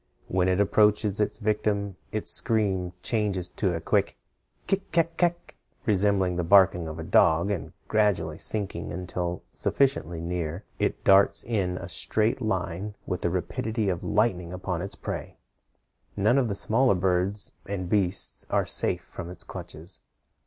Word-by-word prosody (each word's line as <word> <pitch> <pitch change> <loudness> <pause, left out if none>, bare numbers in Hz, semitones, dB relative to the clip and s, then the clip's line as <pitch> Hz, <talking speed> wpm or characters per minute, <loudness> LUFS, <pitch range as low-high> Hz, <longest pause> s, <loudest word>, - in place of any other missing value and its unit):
When 90 0 +1
it 95 +1 +2
approaches 105 0 +3
its 105 - 0
victim 105 -2 -1 0.2
its 110 - 0
scream 95 -6 +2
changes 100 -6 -1
to 90 -2 -1
a - - -2
quick - - 0 0.5
kik 195 0 -1
kak 165 0 +1
kak, 175 0 -1 0.3
resembling 95 -3 +2
the 90 - 0
barking 90 -2 +5
of 80 0 -6
a 80 - -5
dog, 85 +4 +3
and 100 - -3 0.2
gradually 105 -8 +1
sinking 105 -3 -2
until 90 0 -4
sufficiently 90 - 0
near, 85 +1 -3 0.2
it - - -1
darts 95 0 +5
in 95 -6 -1
a 90 - -6
straight 110 +6 +1
line 95 -1 -2
with 90 - -3
the 85 - +1
rapidity 100 +5 -2
of 90 -2 -2
lightning 95 -6 +1
upon 90 -2 -3
its 95 - -5
prey. - - -6 0.8
None 110 +7 +3
of 125 - +1
the 100 - -2
smaller 115 +3 +3
birds 95 +3 0 0.2
and 95 -2 -3
beasts 95 -1 0
are - - +1
safe - - +1
from 85 - -8
its 90 0 -5
clutches. 85 -1 -8
95 Hz, 150 wpm, -26 LUFS, 90-105 Hz, 0.8 s, barking